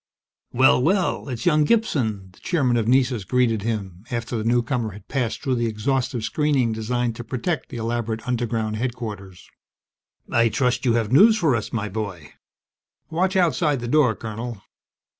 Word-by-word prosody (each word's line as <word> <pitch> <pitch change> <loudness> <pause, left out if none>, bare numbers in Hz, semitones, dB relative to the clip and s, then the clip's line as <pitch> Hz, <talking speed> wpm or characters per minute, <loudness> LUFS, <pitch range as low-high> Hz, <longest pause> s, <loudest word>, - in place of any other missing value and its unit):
"Well, 130 0 +4
well, 180 0 +1
it's 120 -3 -5
young 155 -3 +4
Gibson!" 120 - 0
the 90 - -22
Chairman 135 -9 +1
of 115 -2 0
Nessus 125 -3 +2
greeted 115 -1 +1
him, 100 -4 -4
after 120 0 -3
the 110 - -2
newcomer 120 -1 0
had 105 0 -13
passed 125 -5 -2
through 130 - 0
the 120 -1 0
exhaustive 120 +2 -1
screening 140 -2 +1
designed 115 +1 -1
to 120 - -6
protect 130 +8 -3
the 125 - -7
elaborate 115 -1 -3
underground 115 -3 -1
headquarters. 105 -6 -5 0.8
"I 115 0 +4
trust 125 +2 0
you 120 - +3
have 115 -2 0
news 215 - +7
for 160 - +2
us, 110 - -3
my 110 -2 -2
boy. 100 -8 -6 0.8
Watch 185 +4 0
outside 155 -5 +2
the 120 - -5
door, 125 -4 +3
Colonel!" 110 +1 -6
120 Hz, 160 wpm, -23 LUFS, 110-130 Hz, 0.8 s, news